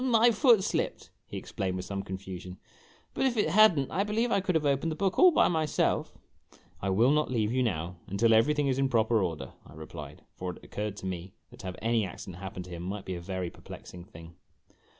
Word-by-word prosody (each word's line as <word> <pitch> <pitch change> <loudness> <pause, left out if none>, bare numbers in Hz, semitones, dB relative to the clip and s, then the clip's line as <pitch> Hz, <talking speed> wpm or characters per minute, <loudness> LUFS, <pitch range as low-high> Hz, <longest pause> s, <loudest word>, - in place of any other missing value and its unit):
"My 240 -2 +5
foot 225 -2 +5
slipped," - - -2 0.2
he - - -6
explained 95 -1 -3
with 90 0 -4
some 100 -1 -3
confusion; 95 -1 -7 0.6
"but 270 - +1
if 245 -3 -1
it 210 - +2
had 215 -1 +6
n't, 135 -1 -1
I 195 - +1
believe 225 +3 0
I - - +3
could 185 -2 -1
have 155 -2 +2
opened 140 +3 +1
the - - -3
book 190 +1 0
all 370 - +9
by 335 - +4
myself! 160 -3 0 0.2
" - - -27
" - - -31
I 100 - -1
will 115 +8 +4
not 150 +1 +2
leave 110 -4 0
you, 130 - +2
now, 90 -6 -2
until 115 +4 +3
everything 145 +6 +3
is 135 0 +1
in 135 -1 +2
proper 115 -2 +3
order," 85 -5 -3
I - - -15
replied; 75 -2 -9
for 90 -1 -5
it - - -17
occurred 105 -1 -4
to 95 - -8
me 90 0 -5 0.2
that - - -15
to 95 - -7
have 90 - -5
any 115 -1 +2
accident 90 -1 -8
happen 95 -1 -6
to 90 - -13
him 85 -1 -6
might 95 +3 -5
be 95 - -4
a 85 - -5
very 90 -1 -4
perplexing 90 -1 -11
thing. 80 -1 -13
105 Hz, 235 wpm, -29 LUFS, 90-155 Hz, 0.6 s, all